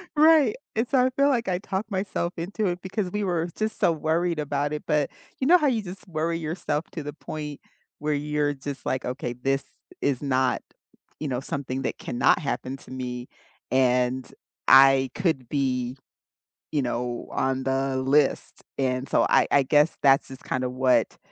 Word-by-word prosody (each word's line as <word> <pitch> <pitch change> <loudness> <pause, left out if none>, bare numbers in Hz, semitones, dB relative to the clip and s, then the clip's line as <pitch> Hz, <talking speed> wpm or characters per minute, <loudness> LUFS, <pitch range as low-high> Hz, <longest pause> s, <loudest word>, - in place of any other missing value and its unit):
Right, 305 -6 +6 0.2
and 225 +2 +1
so 255 -2 +4
I - - +3
feel 280 +2 +3
like 235 -6 +1
I 180 -1 +1
talked 200 +2 -4
myself 190 -2 -2
into 200 +5 -2
it 175 0 -2
because 190 0 -3
we 210 0 -1
were 175 -3 0
just 220 0 -2
so 170 - +4
worried 160 +1 0
about 145 0 -1
it, 150 - -4
but, 150 -2 +1 0.3
you 265 - 0
know 360 +2 +8
how 300 - +1
you 235 -5 +1
just 185 -1 -9
worry 165 0 -1
yourself 155 -1 -2
to 160 - -5
the 145 0 -6
point 150 -2 -7 0.4
where 150 +1 0
you're 150 0 0
just 140 0 -7
like, 130 - -1
"Okay, 125 -1 -3
this 135 +2 -1 0.4
is 140 -2 0
not, 130 -2 +1 0.6
you 150 - -3
know, 125 -2 -1
something 135 -1 -4
that - - -2
cannot 120 - +2
happen 130 -2 -3
to - - -15
me 125 -1 -5 0.4
and 125 0 +2 0.4
I 135 -1 +7
could 160 -10 0
be, 130 -3 -1 0.7
you 150 -2 +1
know, 120 0 -3
on 130 0 0
the 135 0 0
list," 135 +2 +1
and 130 0 -1
so, - - +3
I - - +4
I 140 -1 +5
guess 150 +4 +3
that's 135 -1 +5
just 130 -1 -11
kinda 130 -1 -2
what 130 0 +2
145 Hz, 180 wpm, -25 LUFS, 130-175 Hz, 0.7 s, know